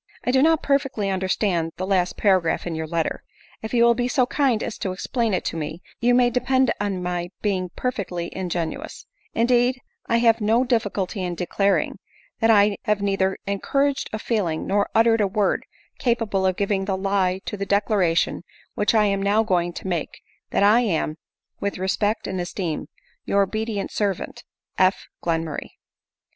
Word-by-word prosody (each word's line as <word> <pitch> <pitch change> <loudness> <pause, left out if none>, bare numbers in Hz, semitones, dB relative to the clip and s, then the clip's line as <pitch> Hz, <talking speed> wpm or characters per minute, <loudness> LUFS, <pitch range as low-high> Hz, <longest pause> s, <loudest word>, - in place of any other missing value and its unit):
I - - +1
do 260 +1 +4
not 320 +1 +3
perfectly 270 -8 0
understand 185 -3 0
the 185 - -2
last 185 -2 +1
par 190 -3 +4
agraph 165 - -1
in 175 - -3
your 160 0 -3
letter. 165 0 -2 0.4
If 220 - -6
you 235 -1 +4
will 235 0 +6
be 245 +1 -1
so 250 0 +2
kind 255 -4 +1
as 225 - -5
to 190 - -2
ex 185 - -6
plain 235 -3 0
it - - -3
to - - -2
me, 155 +2 -5 0.2
you 245 +1 +3
may 245 -1 +4
depend 260 +2 +2
on 195 -3 -2
my 175 0 -2
being 185 -3 0
perfectly 190 -9 -3
ingenuous; 175 -3 -4 0.3
indeed 245 +2 +3 0.3
I 230 - +3
have 230 -1 +3
no 225 +4 +3
difficulty 210 -5 -1
in 180 -1 -2
declaring; 195 +3 0 0.4
that 225 - +3
I 205 -2 +5
have 210 -1 +1
neither 195 -1 +1
encouraged 275 +8 0
a 215 - -2
feeling, 200 -8 -1
nor 200 +1 +1
uttered 225 0 +4
a 205 - +3
word, 200 +1 0 0.3
capable 225 -6 +1
of 185 - +1
giving 200 -1 0
the 190 -1 -1
lie 190 -1 +1
to - - -4
the 200 -1 -4
declaration 200 -4 +1 0.3
which 210 +2 +1
I 215 -1 +5
am 200 -1 +1
now 205 +3 +3
going 175 -4 +1
to - - -7
make 175 -4 -3
— - - -46
That - - +1
I 210 +4 +6
am,' 165 -9 0 0.2
" - - -53
With 200 - -2
respect 200 +4 0
and 185 -1 -2
esteem, 175 -3 -3 0.2
" - - -38
Your 200 0 +3
obedient 215 +1 -3
servant, 200 -4 -3 0.3
"F. 185 +1 +3 0.2
Glenmurray." 165 -3 -2
200 Hz, 185 wpm, -23 LUFS, 185-230 Hz, 0.4 s, will